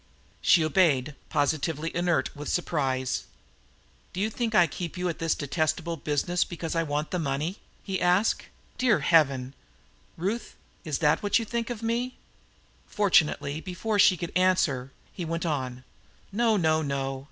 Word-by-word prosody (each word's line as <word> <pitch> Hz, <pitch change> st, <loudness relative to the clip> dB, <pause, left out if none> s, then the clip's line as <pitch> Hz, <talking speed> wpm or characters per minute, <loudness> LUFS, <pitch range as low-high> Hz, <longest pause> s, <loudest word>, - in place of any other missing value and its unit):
She 165 Hz, -4 st, +5 dB
obeyed, 150 Hz, -4 st, +2 dB, 0.2 s
positively 155 Hz, +2 st, 0 dB
inert 175 Hz, -6 st, 0 dB
with 145 Hz, +1 st, -6 dB
surprise. 135 Hz, -7 st, -1 dB, 0.9 s
"Do 180 Hz, -, -4 dB
you 215 Hz, +3 st, 0 dB
think 225 Hz, -1 st, -2 dB
I 175 Hz, -, +7 dB
keep 170 Hz, +2 st, -6 dB
you 180 Hz, 0 st, -1 dB
at 165 Hz, -, -5 dB
this 165 Hz, -1 st, +1 dB
detestable 155 Hz, +3 st, -1 dB
business 155 Hz, +4 st, 0 dB
because 170 Hz, -1 st, -5 dB
I 165 Hz, -, +2 dB
want 150 Hz, -1 st, -2 dB
the 180 Hz, -, -1 dB
money?" 155 Hz, +5 st, -2 dB, 0.3 s
he 190 Hz, -2 st, -3 dB
asked. 180 Hz, +4 st, +2 dB, 0.3 s
"Dear 245 Hz, -4 st, +3 dB
Heaven! 135 Hz, -5 st, +3 dB, 0.6 s
Ruth, 205 Hz, +7 st, -3 dB, 0.3 s
is 155 Hz, -6 st, -2 dB
that 150 Hz, -, +4 dB
what 205 Hz, -, +3 dB
you 230 Hz, -, -2 dB
think 235 Hz, +1 st, -3 dB
of 235 Hz, -2 st, -5 dB
me?" 240 Hz, +3 st, -1 dB, 0.7 s
Fortunately, 160 Hz, -6 st, +2 dB
before 200 Hz, +4 st, -2 dB
she 190 Hz, -2 st, +6 dB
could 170 Hz, +1 st, -5 dB
answer, 165 Hz, -8 st, +2 dB, 0.2 s
he 180 Hz, -, -5 dB
went 165 Hz, +1 st, -3 dB
on: 130 Hz, -5 st, -3 dB, 0.5 s
"No, 225 Hz, +1 st, +2 dB
no, 160 Hz, -3 st, +2 dB
no! 135 Hz, -2 st, -2 dB
165 Hz, 150 wpm, -27 LUFS, 145-190 Hz, 0.9 s, I